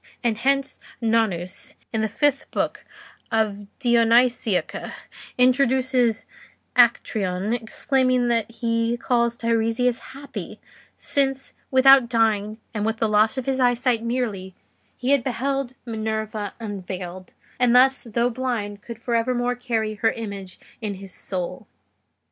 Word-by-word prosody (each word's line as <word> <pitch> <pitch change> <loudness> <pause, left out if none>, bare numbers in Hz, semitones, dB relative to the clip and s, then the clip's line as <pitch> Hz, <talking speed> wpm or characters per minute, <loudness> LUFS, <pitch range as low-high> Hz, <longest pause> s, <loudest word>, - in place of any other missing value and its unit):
And 230 -2 0
hence, 275 +2 0 0.2
Nonnus, 220 -6 -1 0.2
in 220 - 0
the 220 - +1
fifth 280 +5 0
book - - -2 0.5
of 210 -3 0
the 240 -3 +2
'Dionysiaca,' 235 -3 +2 0.4
introduces 255 -2 +2 0.5
Actreon 215 -4 +2
exclaiming 255 +2 +1
that 230 -2 +1
he 230 0 -1
calls 235 -1 +1
Teiresias 230 +1 +1 0.2
happy, 270 -8 -8 0.4
since, 270 -1 -1 0.2
without 260 -2 +6
dying, 220 -2 +1 0.2
and 210 -2 -2
with 225 +1 0
the 225 - +1
loss 215 +3 +3
of 260 - -3
his 265 -1 0
eyesight 245 -1 +2
merely, 225 -6 -3 0.4
he 255 +2 -1
had 280 -3 +3
beheld 270 0 -2
Minerva 220 -2 -3
unveiled, 185 -4 -7 0.2
and 250 -1 +4
thus, 265 +2 +5
though 235 +2 0
blind, 225 -5 -3
could 235 0 -8
for 235 +1 -4
evermore 245 +1 +1
carry 230 -3 -2
her 225 +1 +1
image 200 -4 -7 0.2
in 210 -3 -3
his 190 -1 -11
soul." 180 -3 -4
230 Hz, 125 wpm, -23 LUFS, 215-250 Hz, 0.5 s, without